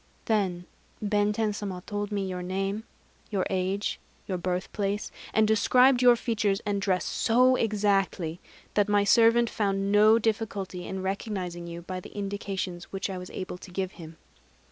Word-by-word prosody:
Then 190 Hz, -5 st, 0 dB, 0.3 s
Benten 210 Hz, +1 st, +1 dB
Sama 195 Hz, -3 st, -5 dB
told 205 Hz, 0 st, -3 dB
me 200 Hz, -2 st, -1 dB
your 180 Hz, -1 st, -4 dB
name, 195 Hz, +4 st, -2 dB, 0.4 s
your 195 Hz, -3 st, 0 dB
age, 190 Hz, +2 st, -1 dB, 0.3 s
your 185 Hz, -2 st, -3 dB
birthplace, 195 Hz, +3 st, -2 dB, 0.2 s
and 220 Hz, -1 st, +3 dB
described 250 Hz, +4 st, +5 dB
your 245 Hz, -1 st, +7 dB
features 215 Hz, -4 st, 0 dB
and 200 Hz, -1 st, 0 dB
dress 185 Hz, -3 st, +1 dB
so 250 Hz, +3 st, +3 dB
exactly 200 Hz, -6 st, 0 dB, 0.3 s
that 205 Hz, 0 st, +2 dB
my 205 Hz, -1 st, +4 dB
servant 230 Hz, +3 st, +5 dB
found 195 Hz, -2 st, 0 dB
no 215 Hz, +2 st, +6 dB
difficulty 205 Hz, -5 st, -2 dB
in 190 Hz, 0 st, -4 dB
recognizing 190 Hz, -3 st, -3 dB
you 170 Hz, 0 st, -7 dB
by 185 Hz, +1 st, -5 dB
the 185 Hz, -, -12 dB
indications 195 Hz, -3 st, -4 dB
which 195 Hz, 0 st, -4 dB
I 185 Hz, -, -4 dB
was 180 Hz, -, -8 dB
able 185 Hz, -1 st, -6 dB
to 185 Hz, -, -11 dB
give 185 Hz, +1 st, -3 dB
him." 160 Hz, -3 st, -11 dB
200 Hz, 155 wpm, -27 LUFS, 185-210 Hz, 0.4 s, your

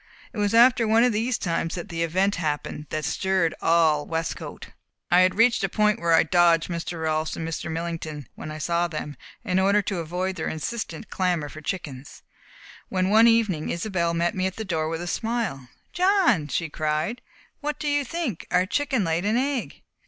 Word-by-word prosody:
It 225 Hz, -, -5 dB
was 205 Hz, +1 st, +1 dB
after 235 Hz, -1 st, +6 dB
one 225 Hz, +2 st, +4 dB
of 245 Hz, -2 st, +3 dB
these 225 Hz, +3 st, 0 dB
times 165 Hz, -1 st, -2 dB
that 180 Hz, +3 st, -6 dB
the 165 Hz, -1 st, -3 dB
event 190 Hz, +5 st, +1 dB
happened 150 Hz, -2 st, -3 dB
that 155 Hz, -1 st, -3 dB
stirred 190 Hz, -2 st, +1 dB
all 160 Hz, -3 st, +3 dB
Westcote. 165 Hz, 0 st, -4 dB, 0.4 s
I 175 Hz, -, +6 dB
had 185 Hz, 0 st, +4 dB
reached 230 Hz, 0 st, +3 dB
a 195 Hz, -, +1 dB
point 210 Hz, +3 st, +2 dB
where 170 Hz, -1 st, +2 dB
I -, -, +5 dB
dodged 170 Hz, 0 st, +3 dB
Mr. 170 Hz, -1 st, -4 dB
Rolfs 155 Hz, 0 st, -1 dB
and 165 Hz, -, -4 dB
Mr. 165 Hz, 0 st, -4 dB
Millington 160 Hz, -4 st, -5 dB
when -, -, -8 dB
I 155 Hz, -, -6 dB
saw 170 Hz, +3 st, 0 dB
them, 155 Hz, -3 st, -6 dB, 0.3 s
in 185 Hz, -4 st, +1 dB
order 200 Hz, +2 st, +3 dB
to 190 Hz, -1 st, -2 dB
avoid 180 Hz, +3 st, -3 dB
their 160 Hz, -, -3 dB
insistent 190 Hz, +3 st, -5 dB
clamour 175 Hz, -5 st, 0 dB
for 155 Hz, +3 st, -10 dB
chickens, 145 Hz, -6 st, -6 dB, 0.7 s
when 185 Hz, +1 st, 0 dB
one 225 Hz, +2 st, +7 dB
evening 215 Hz, -9 st, +2 dB
Isobel 170 Hz, -2 st, -1 dB
met 170 Hz, +1 st, +1 dB
me 185 Hz, 0 st, 0 dB
at 190 Hz, -, -6 dB
the 220 Hz, -, -5 dB
door 160 Hz, -4 st, -1 dB
with 165 Hz, +1 st, -3 dB
a -, -, -6 dB
smile. 220 Hz, -, -2 dB, 0.2 s
"John!" 360 Hz, -, +3 dB
she 165 Hz, +3 st, -1 dB
cried. 155 Hz, +9 st, -2 dB, 0.4 s
"What 295 Hz, -1 st, -3 dB
do 300 Hz, -, -4 dB
you 290 Hz, 0 st, +2 dB
think! 275 Hz, -, -4 dB
Our 180 Hz, +1 st, +3 dB
chicken 270 Hz, +1 st, 0 dB
laid 165 Hz, 0 st, 0 dB
an 215 Hz, +3 st, +1 dB
egg!" 270 Hz, -1 st, -2 dB
180 Hz, 195 wpm, -25 LUFS, 160-220 Hz, 0.7 s, one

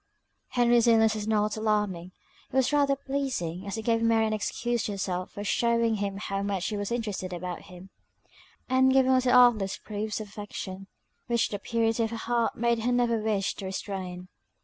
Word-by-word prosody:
Henry's 240 Hz, -1 st, +3 dB
illness 225 Hz, -1 st, +5 dB
was 215 Hz, -1 st, -4 dB
not 210 Hz, -1 st, +1 dB
alarming, 210 Hz, -5 st, -1 dB, 0.4 s
it -, -, -8 dB
was 265 Hz, +2 st, +2 dB
rather 280 Hz, -1 st, +3 dB
pleasing, 260 Hz, -11 st, -3 dB
as 200 Hz, +2 st, -4 dB
it 220 Hz, -, -4 dB
gave 230 Hz, -1 st, +2 dB
Mary 225 Hz, -1 st, +3 dB
an 215 Hz, -, -1 dB
excuse 240 Hz, +2 st, -1 dB
to 210 Hz, -, -2 dB
herself 185 Hz, -2 st, -3 dB
for 205 Hz, -, -7 dB
shewing 230 Hz, +1 st, +1 dB
him 200 Hz, -1 st, -3 dB
how 195 Hz, -1 st, -3 dB
much 200 Hz, -2 st, -2 dB
she 210 Hz, -, -2 dB
was 205 Hz, +1 st, -3 dB
interested 210 Hz, -6 st, -3 dB
about 180 Hz, 0 st, -5 dB
him; 180 Hz, +1 st, -13 dB, 0.8 s
and 260 Hz, 0 st, +4 dB
giving 260 Hz, 0 st, +4 dB
little 255 Hz, -1 st, +3 dB
artless 235 Hz, -6 st, +5 dB
proofs 215 Hz, 0 st, -4 dB
of 215 Hz, -, -6 dB
affection, 195 Hz, -2 st, -7 dB, 0.4 s
which 235 Hz, -1 st, +1 dB
the 205 Hz, -, -4 dB
purity 225 Hz, +1 st, 0 dB
of 225 Hz, -, -1 dB
her 230 Hz, -, -5 dB
heart 235 Hz, 0 st, 0 dB
made 235 Hz, 0 st, +1 dB
her 240 Hz, +3 st, 0 dB
never 240 Hz, -2 st, +2 dB
wish 210 Hz, -3 st, 0 dB
to 195 Hz, -, -8 dB
restrain. 190 Hz, -2 st, -5 dB
220 Hz, 190 wpm, -27 LUFS, 195-235 Hz, 0.8 s, illness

